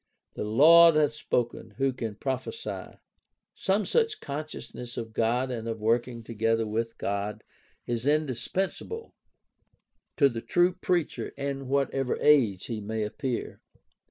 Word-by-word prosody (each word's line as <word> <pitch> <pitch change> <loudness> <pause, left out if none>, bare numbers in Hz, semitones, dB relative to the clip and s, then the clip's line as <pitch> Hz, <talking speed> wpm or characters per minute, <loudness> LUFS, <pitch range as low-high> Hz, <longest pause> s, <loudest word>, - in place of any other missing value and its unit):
"The - - -4
Lord 160 +9 +7
hath 150 -1 +3
spoken; 120 -6 -2
who 135 0 +1
can 115 -4 -4
but 100 - -25
prophesy?" 135 - -4 0.6
Some 195 +2 0
such 455 -2 +1
consciousness 140 -4 -7
of 115 -2 -5
God 120 +4 +1
and 115 -2 -4
of 115 -1 -3
working 115 +2 0
together 115 0 0
with 115 +2 -2
God 100 +1 -3 0.4
is 120 +2 -2
indispensable 155 - -1 1.0
to 140 - +6
the 115 -4 -4
true 175 +6 +3
preacher 180 -3 -1
in 140 -1 -3
whatever 135 -1 0
age 120 -11 +4
he 110 -2 -4
may 110 +1 -2
appear. 120 +4 -4
125 Hz, 130 wpm, -28 LUFS, 115-150 Hz, 1.0 s, Lord